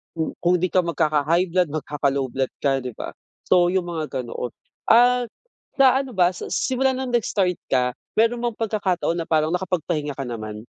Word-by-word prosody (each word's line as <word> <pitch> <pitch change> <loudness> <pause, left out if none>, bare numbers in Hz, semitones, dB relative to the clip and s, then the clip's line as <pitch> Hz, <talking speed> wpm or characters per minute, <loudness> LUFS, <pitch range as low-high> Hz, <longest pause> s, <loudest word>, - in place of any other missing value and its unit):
kung 160 -1 -2
kung 175 +1 +2
di 185 - +1
ka 185 - +4
magkaka-high 165 +2 +1
blood, 180 0 +2
magkaka-low 140 -2 -1
blood 130 -1 -1
ka, 135 -1 +2
'di 125 -2 -6
ba? - - -6 0.4
So, 180 -1 +5
yung 185 -2 0
mga 155 -6 -3
ganoon. 120 0 -5 0.4
Ah, 245 +1 +5 0.5
sa 265 -1 +5
ano 265 - -9
ba 180 -1 +4
sa - - -6
s - - 0
simula 265 +1 +2
nung 260 -1 -3
nag-start 200 -6 +1
ka, 125 -1 +2 0.2
meron 230 +2 +3
bang 235 -2 -1
pagkakataon 195 -6 0
na 165 - -4
parang 155 0 +2
nakapagpahinga 170 -5 -2
ka 135 - -3
naman? 110 -2 -6
175 Hz, 185 wpm, -23 LUFS, 145-215 Hz, 0.5 s, So